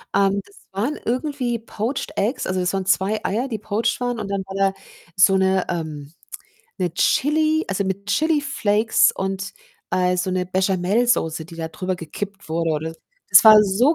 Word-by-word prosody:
ähm, 200 0 +2
das 200 - -21 0.2
waren 225 +10 -2
irgendwie 250 -1 -1
poached 230 +4 -4
Eggs, 220 +7 -1
also 185 0 -1
das 180 +1 -1
waren 190 -1 -2
2 195 +3 +1
Eier, 235 +7 -1
die 220 -5 -4
poached 215 +3 -1
waren 245 -2 -2
und 200 - -4
dann 195 -1 -2
war 195 0 -8 0.2
da - - -23 0.4
so 190 +1 +5
'ne 190 0 +2
ähm, 155 -3 -5 0.7
'ne 180 -3 -2
Chili 310 +2 +2
also, 195 0 -1
mit 195 +1 -4
Chili-Flakes 275 -5 +2
und, 195 0 -4 0.4
äh, 180 0 +1
so 185 +1 -1
'ne 185 0 -1
Béchamelsoße, 185 -2 +1
die 165 0 -12
da 160 -1 -4
drüber 185 +3 -4
gekippt 195 +4 -7
wurde 165 0 -1
oder 160 +1 -2 0.4
das - - +9
war 215 -1 +10
so 235 +11 +3
195 Hz, 170 wpm, -21 LUFS, 180-230 Hz, 0.7 s, war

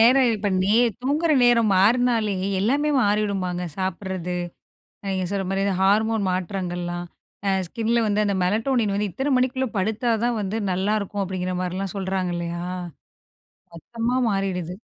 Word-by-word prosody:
நேரம் 250 +3 +6
இப்ப 205 -1 -1
நே 200 +3 +2 0.3
தூங்குற 305 +5 +1
நேரம் 230 -3 +4
மாறுனாலே, 225 +1 +3 0.3
எல்லாமே 280 +9 +1
மாறிடுமாங்க, 200 -4 0 0.2
சாப்படறது, 185 -1 -3 0.7
நீங்க 190 -1 -1
சொல்ற 195 -1 -1
மாரி, 195 0 0
இந்த 200 - +1
ஹார்மோன் 215 +2 +3
மாற்றங்கள்லாம் 175 -1 -3 0.4
அ - - +3 0.2
ஸ்கின்ல 230 +5 0
வந்து 210 0 +1
அந்த 200 -1 0
மெலடோனின் 220 +3 +1
வந்து, 205 -1 -1
இத்தனை 270 - -1
மணிக்குள்ள 260 +1 +1
படுத்தாதான் 225 +3 0
வந்து 205 +1 -2 0.2
நல்லாருக்கும், 200 +2 -1
அப்படிங்கிற 185 -1 -3
மாரிலாம் 185 +2 -3
சொல்றாங்க, 190 -2 -1
இல்லயா, 170 0 -4 1.1
மொத்தமா 230 +7 -3
மாறிடுது. 190 -4 -2
200 Hz, 130 wpm, -23 LUFS, 185-230 Hz, 1.1 s, நேரம்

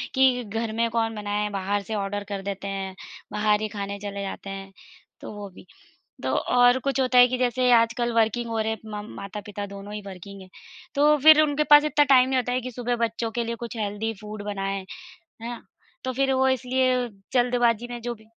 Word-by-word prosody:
कि 260 -2 +4
घर 225 +1 -3
में 230 0 +1
कौन 225 -1 0
बनाए, 210 0 -2
बाहर 200 +1 -1
से 220 +2 -4
ऑर्डर 205 0 -3
कर 200 -1 -3
देते 200 0 -5
हैं, 195 -1 -4 0.4
बाहर 210 0 +2
ही 215 - -1
खाने 200 -1 -5
चले 200 -1 -5
जाते 195 0 -6
हैं, 195 0 -7 0.5
तो - - -7
वो 205 -1 -7
भी। 185 - -15 0.6
तो - - 0
और 245 +1 +4
कुछ 270 +1 -1
होता 255 -1 +3
है 245 - +9
कि 255 0 -2
जैसे 250 0 +2
आजकल 235 +1 +3
वर्किंग 230 +1 +1
हो 225 - -2
रहे, 220 0 0
मम 210 -1 -6
माता-पिता 205 +1 -6
दोनों 200 +1 -9
ही 210 - -4
वर्किंग 195 +1 -9
है 185 - -14 0.5
तो 300 +1 +5
फिर 310 0 +9
उनके 300 0 +1
पास 295 0 +9
इतना 295 -1 +3
टाइम 260 -2 +5
नहीं 260 -1 +1
होता 245 0 -1
है 255 - +1
कि 255 +1 -6
सुबह 245 0 -2
बच्चों 230 0 -1
के 235 +1 -2
लिए 235 +1 -3
कुछ 235 0 -7
हेल्दी 215 +1 -2
फूड 210 0 -7
बनाएँ। 195 -1 -3 0.6
है 235 - -4
ना 240 - -7 0.4
तो 260 - -1
फिर 270 +1 +1
वो 265 0 +3
इसलिए 255 -1 +1 0.2
जल्दबाज़ी 240 -2 +2
में 240 - -5
जो 240 0 -3
भी 220 0 -19
225 Hz, 210 wpm, -25 LUFS, 205-250 Hz, 0.6 s, है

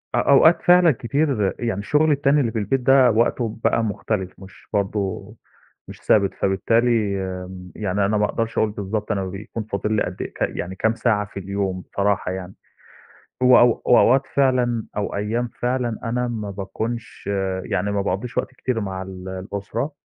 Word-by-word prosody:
أ - - +2
أوقات 155 +4 +5
فعلًا 180 -1 +6
كتير 130 -4 0
يعني 115 -4 -2
شُغلي 150 +6 +3
التاني 145 +1 +2
اللي 115 -4 0
في 110 - -2
البيت 115 +6 0
ده 130 -1 +5
وقته 115 0 0
بقى 115 - +2
مختلف 100 -2 -2
مش 95 -2 -15
برضه 100 0 -2 0.5
مش - - -11
ثابت، 100 -2 +3
فبالتالي 115 +5 +1 0.6
م 90 -2 -10
يعني 100 -1 0
أنا 105 +1 +1
ما 105 - +2
أقدرش 115 +2 -3
أقُول 110 -1 +2
بالضبط 105 +1 -3
أنا 95 -2 -1
بيكون 100 +4 -6
فاضل 105 0 -2
لي 105 - +2
قد 90 - -5
إيه - - -6
ك - - -16
يعني 95 +2 -2
كام 110 +3 +1
ساعة 110 -4 +1
في 100 -1 -8
اليوم 95 -1 -3
بصراحة 100 -2 -1
يعني 95 0 -6 0.9
وأو 125 -2 +5
وأوقات 130 +2 +5
فعلًا 125 -4 +2
أو 105 - -2
أيام 115 +4 -1
فعلًا 120 -2 -1
أنا 125 +1 -1
ما 105 -4 -4
باكونش 110 +5 -5 0.4
يعني 100 +3 -1
ما 100 -1 0
باقضّيش 100 +5 -3
وقت - - -1
كتير 125 -3 -2
مع 95 -2 -4
ال 95 0 -8
الأسرة 100 +8 -4
110 Hz, 170 wpm, -22 LUFS, 100-120 Hz, 0.9 s, فعلًا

